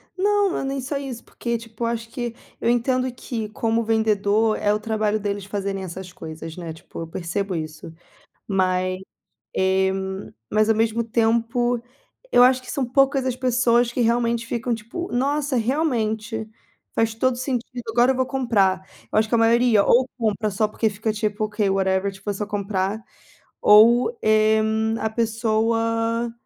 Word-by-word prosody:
Não, 405 0 +2
não - - -2
é - - -3
nem 270 0 -2
só 280 +3 -3
isso, 265 -4 -6
porque 235 -1 -3
tipo, 230 0 -8
eu 230 - +1
acho 230 -1 -3
que 240 -1 -4 0.3
eu - - +1
entendo 255 +2 +1
que, 225 -3 -5
como 225 +2 0
vendedor, 220 -1 +2
é 205 - +1
o 210 - 0
trabalho 215 -1 0
deles 200 -1 -3
fazerem 195 -1 -3
essas 185 0 -7
coisas, 160 0 -8
né, 170 -2 -6
tipo, 160 - -11
eu 165 - -5
percebo 185 +4 -3
isso. 155 0 -6 0.5
Mas, 185 -1 0 0.6
eh, 190 0 +2 0.6
mas 215 +1 +3
ao 225 - +4
mesmo 225 +1 +1
tempo, 230 +1 +1 0.5
eu 245 - +7
acho 255 0 +4
que 255 - -8
são 275 -3 -1
poucas 270 +1 +2
as 255 -2 0
pessoas 245 -2 +2
que 250 - 0
realmente 235 0 +1
ficam 240 +1 -1
tipo: 230 +11 -6
"Nossa, 280 +3 0
realmente. 225 -4 -1 0.5
Faz 225 -1 +1
todo 255 +3 +1
o 245 - -8
sentido, 250 -1 -3
agora 240 +3 +4
eu - - -1
vou 260 0 +1
comprar." 200 -8 +1 0.2
Eu - - 0
acho 215 0 0
que - - +2
a - - +4
maioria 230 -1 +4
ou 250 +2 +4
compra 215 -2 0
só 210 +2 0
porque 220 +1 0
fica 215 +1 -2
tipo: 215 0 -1
"Ok, 210 -1 -1
whatever." 190 0 +1
Tipo, 195 +2 -8
é - - 0
só 210 +1 -3
comprar. 200 +1 -2 0.6
Ou, 235 - +6
eh, 215 0 +4 0.4
a 220 - 0
pessoa 230 +1 0
225 Hz, 170 wpm, -23 LUFS, 205-245 Hz, 0.6 s, eu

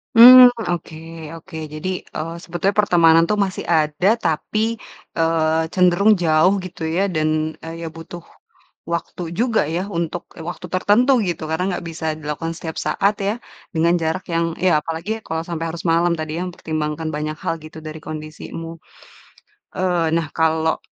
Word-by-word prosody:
Mmm, 250 +2 +11 0.2
oke, 170 -2 -4 0.4
oke. 165 0 -10 0.2
Jadi, 155 +4 -4 0.3
eee, 165 +2 -4
sebetulnya 175 +3 -1
pertemanan 165 -5 +5
tuh 210 - +2
masih 190 - -6
ada 160 +3 +2
tapi, 215 +6 -1 0.4
eee, 160 -1 +2
cenderung 185 +3 +4
jauh 160 +4 +4
gitu 170 -3 -5
ya. 175 +5 +1
Dan, 155 0 +1 0.3
eee, 165 +1 -8
ya 165 - -3
butuh 165 +1 -10 0.7
waktu 170 +1 -4 0.2
juga 235 -2 +2
ya 170 +4 -2 0.2
untuk 170 +1 -3 0.3
waktu 180 +1 -7
tertentu 210 +8 +4 0.2
gitu 170 - -4
karena 160 +3 0
nggak - - -8
bisa 165 0 -6
dilakukan 155 +2 -4
setiap 160 -2 -6
saat 205 +1 +1
ya, 205 - 0 0.4
dengan 165 +2 +3
jarak 160 +4 -1
yang 165 0 0
ya, 180 -4 +4
apalagi 165 +8 -4
kalau 160 0 -2
sampai 165 -1 -3
harus 165 +1 -7
malam 170 +1 +3
tadi 155 +1 -3
ya. - - -2
Mempertimbangkan 155 -2 -3
banyak 155 +1 -3
hal - - 0
gitu, 155 +1 -11
dari 155 0 -7
kondisimu. 155 +2 -7 1.0
Eee, 180 -3 +1
nah 165 -3 -1
kalau 160 0 +1
165 Hz, 155 wpm, -20 LUFS, 160-180 Hz, 1.0 s, Mmm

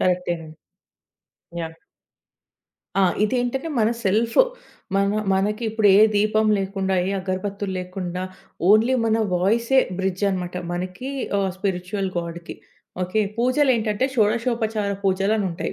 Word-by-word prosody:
కరెక్టే 180 -1 +1
నండి. 155 -1 -12 1.0
యాహ్! 165 0 -6 1.2
ఆ! - - +5 0.2
ఇదేంటంటే 255 +6 -1
మన 215 - +4 0.2
సెల్ఫ్ 220 +4 +1 0.6
మన 200 0 +3 0.3
మనకి 210 +4 0
ఇప్పుడు 220 -1 +3
ఏ - - +7 0.2
దీపం 215 +1 +2
లేకుండా, 195 0 -1
ఏ - - -1
అగర్బత్తుల్లేకుండా, 185 -1 -4 0.5
ఓన్లీ 220 +5 +5
మన 225 0 +2 0.2
వాయిసే 230 +8 +2 0.2
బ్రిడ్జ్‌ 190 0 -2
అనమాట. 180 -1 -3 0.2
మనకి 185 +8 -4 0.3
ఆహ్, 195 -1 +1
స్పిరిచ్యువల్ 190 0 -2
గాడ్‌కి. 170 0 -6 0.5
ఓకే? 185 +5 0 0.2
పూజలేంటంటే 250 -3 +2
షోడశోపచార 220 -2 +1
పూజలనుంటాయి. 195 -1 0
200 Hz, 105 wpm, -23 LUFS, 185-220 Hz, 1.2 s, ఏ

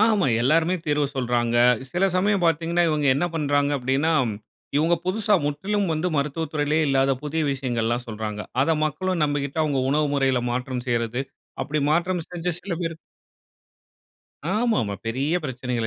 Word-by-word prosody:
ஆமா. 215 -3 +4
எல்லாருமே 160 +8 +3
தீர்வு 150 -1 +2
சொல்றாங்க. 120 -2 0 0.4
சில 175 +2 +2
சமயம் 200 +1 +2
பாத்தீங்கனா 170 +2 +1
இவங்க, 150 -2 +1
என்ன 145 - 0
பண்றாங்க, 145 -2 +1
அப்படினா, 135 +5 +1 0.7
இவங்க 160 +4 +3
புதுச 210 +3 -1 0.2
முற்றிலும் 195 +7 -1
வந்து 160 +3 0
மருத்துவ 150 +3 -1
துறையிலயே 150 +1 +1
இல்லாத 135 0 +3
புதிய 155 +2 -1
விஷயங்கள 125 -4 -2
எல்லாம் 120 +2 -1
சொல்றாங்க. 105 -1 -4 0.2
அத 160 +4 +2
மக்களும் 180 +3 -1
நம்பிகிட்டு, 145 0 -2
அவங்க 145 -3 0
உணவு 150 +1 +2
முறையில 135 -3 +2
மாற்றம் 125 0 -3
செய்யறது. 120 +1 -1 0.4
அப்படி 150 +1 -1
மாற்றம் 175 +1 0
செஞ்ச 175 0 -4
சில 195 - -4
பேர் 165 -1 -4 1.6
ஆமாமா. 215 - +1
பெரிய 135 +8 0
பிரச்சனைகள, 125 -3 -2
145 Hz, 145 wpm, -24 LUFS, 130-165 Hz, 1.6 s, ஆமா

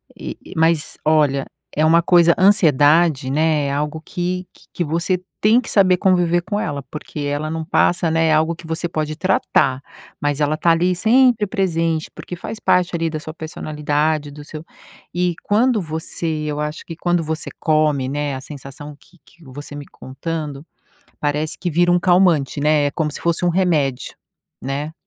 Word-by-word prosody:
E - - -7
e - - -11
mas, 160 -1 +1
olha, 150 -3 +2 0.3
é 155 - +2
uma 165 +2 +5
coisa 170 0 +5
ansiedade, 160 -6 +4
né, 155 0 +1
é - - -2
algo 150 +2 -3
que 180 +2 -3
que - - -21
que 175 - -1
você 170 +3 -1 0.2
tem 220 +4 +4
que 235 - -8
saber 185 -3 +4
conviver 175 -2 +2
com 205 +4 -3
ela, 145 -8 -3
porque 150 0 -8
ela 145 +2 -2
não 160 0 -3
passa, 175 +1 +2
né. 165 0 +2
É 160 - +3
algo 160 +2 +2
que 165 0 -12
você 165 +2 -3
pode 155 -2 -3
tratar, 150 -6 +1 0.4
mas 145 0 -1
ela 150 +1 +1
tá 170 - +3
ali, 175 +2 +2
sempre 230 +2 +3
presente, 165 -5 -1
porque 180 - -8
faz 220 +5 -7
parte 180 -3 +2
ali, 165 -1 -1
da 155 -1 -4
sua 155 +1 -8
personalidade, 150 -1 -2
do 145 +1 -10
seu 155 +2 -9 0.5
E 175 -1 0
quando 225 +2 +2
você 160 +1 -5 0.2
eu 150 -1 -3
acho 150 +1 -4
que 165 - -7
quando 175 0 0
você 160 +1 -4
come, 150 -4 +1
né, 145 0 -2
a 130 - -6
sensação 145 +1 -10
que 180 - -24
que 170 +5 -21
eu 130 - -13
você 145 +1 -9
me 145 0 -7
contando, 145 +1 -6 0.6
parece 150 +1 -1
que 180 - -2
vira 175 +2 +3
um 175 - +3
calmante, 175 -7 +3
né? 150 0 +3
É - - 0
como 150 +1 -2
se - - -6
fosse 170 +1 0
um - - +3
remédio, 165 -8 0 0.5
né? 140 +4 -4
160 Hz, 185 wpm, -20 LUFS, 150-175 Hz, 0.6 s, uma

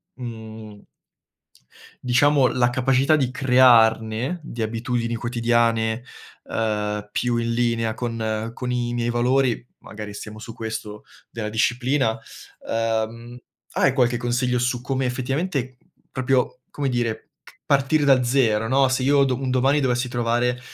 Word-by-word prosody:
mhmm 110 -3 -9 1.2
diciamo 130 +2 +4
la 120 -1 +2
capacità 135 +4 +2
di 130 -4 0
crearne, 125 +1 +3
di 120 -6 -7
abitudini 115 +1 -2
quotidiane, 115 -1 0 0.5
ehm, 105 -1 -2
più 120 +2 0
in 115 0 -1
linea 115 -1 0
con 110 -1 -3
con 125 +1 -4
i 120 -1 -1
miei 120 0 -1
valori, 125 0 +1
magari 105 -1 -9
stiamo 105 +1 -8
su 115 +1 -9
questo 110 -2 -6 0.3
della 110 -2 -5
disciplina. 120 +2 +1 0.5
Ehm, 115 +1 -2 0.4
hai 135 - +3
qualche 125 -2 +2
consiglio 125 +1 0
su 125 0 0
come 130 +1 -2
effettivamente, 130 +1 -2 0.3
proprio, 130 -1 0
come 140 -2 -2
dire, 120 -3 -2 0.2
ch - - -18
partire 140 +2 +3
da 135 -3 +4
0, 120 -4 +2
no, 135 +2 +3
se 130 0 0
io 140 +1 +4
do 130 -1 0
un 130 -1 -2
domani 135 +3 +3
dovessi 125 -2 0
trovare, 120 +1 0
120 Hz, 135 wpm, -23 LUFS, 115-130 Hz, 1.2 s, diciamo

